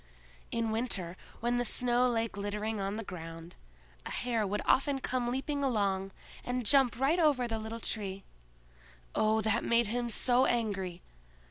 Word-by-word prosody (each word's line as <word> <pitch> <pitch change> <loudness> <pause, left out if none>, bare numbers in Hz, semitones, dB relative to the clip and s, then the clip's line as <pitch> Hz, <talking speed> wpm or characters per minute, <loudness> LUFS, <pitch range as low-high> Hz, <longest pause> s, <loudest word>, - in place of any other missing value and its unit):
In 230 -1 -1
winter, 205 -7 -1 0.3
when 240 +1 +1
the 245 - +2
snow 245 +1 +2
lay 230 -2 +1
glittering 210 +1 -3
on 195 +1 -2
the 225 - -4
ground, 165 -2 -8 0.5
a - - -6
hare 230 -4 -1
would 205 +2 -2
often 275 +1 +3
come 255 -2 -1
leaping 280 +3 -2
along, 200 -6 +1 0.3
and 245 -1 -2
jump 250 0 +4
right 290 +7 +3
over 285 -7 +3
the 225 -1 -2
little 220 +1 -5
Tree. 195 -4 -2 0.9
Oh, 220 +1 +3
that 220 -1 +1
made 235 0 +3
him 240 +1 -1
so 245 +3 +3
angry! 195 -7 -1
230 Hz, 155 wpm, -31 LUFS, 205-245 Hz, 0.9 s, jump